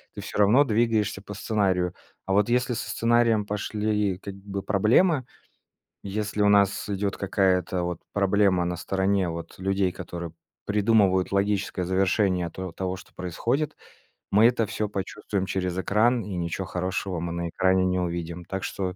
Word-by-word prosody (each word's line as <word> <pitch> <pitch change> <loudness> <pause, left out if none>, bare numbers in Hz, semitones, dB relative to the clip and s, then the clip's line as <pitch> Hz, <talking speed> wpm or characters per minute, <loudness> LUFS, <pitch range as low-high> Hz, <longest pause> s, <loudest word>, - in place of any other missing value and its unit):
ты - - -6
всё - - -5
равно 110 +8 +6
двигаешься 110 -4 +1
по 105 - -9
сценарию. 95 -5 0 0.3
А 95 - -1
вот 105 +3 +3
если 125 +1 +1
со - - -4
сценарием 115 -2 +2
пошли 105 -1 -1
как 100 0 -7
бы 100 0 -6
проблемы, 120 - +3 0.8
если 105 +1 -2
у 105 - +5
нас 100 0 +3
идет 100 0 -1
какая-то 95 -2 +1
вот 85 -1 -3
проблема 100 -2 +3
на 90 0 -2
стороне 95 +1 0
вот 85 +2 -7
людей, 95 0 +1
которые 85 -1 -7 0.3
придумывают 100 -3 +3
логическое 100 -1 0
завершение 95 -1 +1
то 95 -1 -6
того 95 0 -3
что 95 - -15
происходит, 120 - -2 0.6
мы 105 +3 +6
это 120 -2 +1
всё 105 +1 -2
почувствуем 100 0 -3
через 90 -2 -2
экран, 110 +7 +2
и 100 -1 -5
ничего 85 +2 -3
хорошего 90 0 -2
мы 85 +1 -3
на 85 0 -3
экране 95 +2 +2
не 90 0 +1
увидим. 85 0 -4
Так 95 +2 -4
что 95 -2 -3
100 Hz, 160 wpm, -26 LUFS, 90-105 Hz, 0.8 s, равно